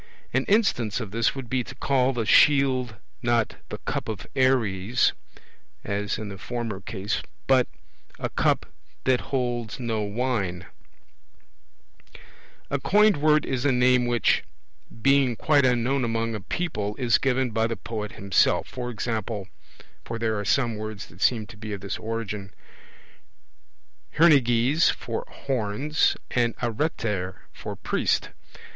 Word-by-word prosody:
An - - +1
instance 195 - +2
of 110 -6 -6
this 115 +4 +1
would 135 -3 -6
be 125 +1 0
to 135 - -10
call 130 0 +2
the 120 -4 -2
shield 130 -3 +4 0.3
not 120 -2 +1
the - - -5
'cup - - -4
of 105 -1 -5
Ares,' 120 -4 +2 0.7
as 100 0 -2
in 110 -2 -5
the 95 -1 -8
former 115 -3 -4
case, 100 +1 -3 0.2
but 130 -2 +4 0.5
a - - -2
'cup - - +1 0.4
that 130 -1 +2
holds 120 -4 -2
no 115 -3 -1
wine'. 100 -5 -2 2.1
A 140 - +1
coined 210 +4 +4
word 150 +1 +3
is 130 -2 -2
a 145 - +3
name 125 0 +3
which, 120 -1 +2 0.6
being 135 -3 +4
quite 145 +1 +3
unknown 125 +2 +1
among 115 0 -1
a 105 - -4
people, 105 - -3
is 120 -3 +2
given 130 -2 +1
by 110 +1 +1
the 115 - -3
poet 110 -2 -5
himself; 95 -2 +1
e.g. 120 -2 -2 0.8
(for 115 - -5
there 115 -1 0
are - - -2
some 120 +1 +1
words 110 -2 -6
that - - -16
seem 115 -4 +2
to 105 0 -13
be 110 -1 -6
of 100 - -6
this 100 - -4
origin) 105 -3 -4 1.7
hernyges 140 -1 +5
for 115 -1 -3
horns, 135 +4 0
and 120 -2 +1
areter 110 - -2 0.2
for - - -7
priest. - - 0
120 Hz, 140 wpm, -25 LUFS, 110-130 Hz, 2.1 s, hernyges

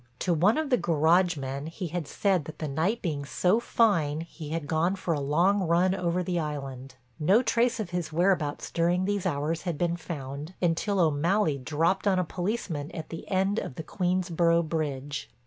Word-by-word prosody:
To 175 - 0
one 185 - +3
of 310 -3 -2
the 250 - +4
garage 170 +2 +3
men 135 +2 -4
he 170 +2 -5
had 170 -2 -3
said 190 -5 +1
that 155 0 -9
the 155 - -3
night 165 +11 -1
being 150 -6 -2
so 180 +8 +2
fine 165 -11 +2
he 165 -2 -9
had 160 -1 -3
gone 165 +5 +1
for 185 -3 -2
a 150 - -1
long 170 +9 +2
run 180 +1 +3
over 180 -1 0
the 175 -1 -1
island. 135 -4 -5 0.2
No 195 +11 +4
trace 235 0 +1
of 205 -5 -4
his 175 -2 -3
whereabouts 170 -3 0
during 175 +2 +1
these 200 -1 0
hours 150 +3 -1
had 175 -4 -3
been 170 +1 0
found 150 0 -6
until 185 +4 +1
O'Malley 160 0 +2
dropped 165 +9 0
on 190 -2 +3
a 185 - +2
policeman 175 -4 -3
at 160 - -6
the 165 - -8
end 195 +3 +1
of 125 - -6
the 160 - -5
Queensborough 175 -2 +1
Bridge. 145 -6 -3
170 Hz, 190 wpm, -27 LUFS, 150-185 Hz, 0.2 s, the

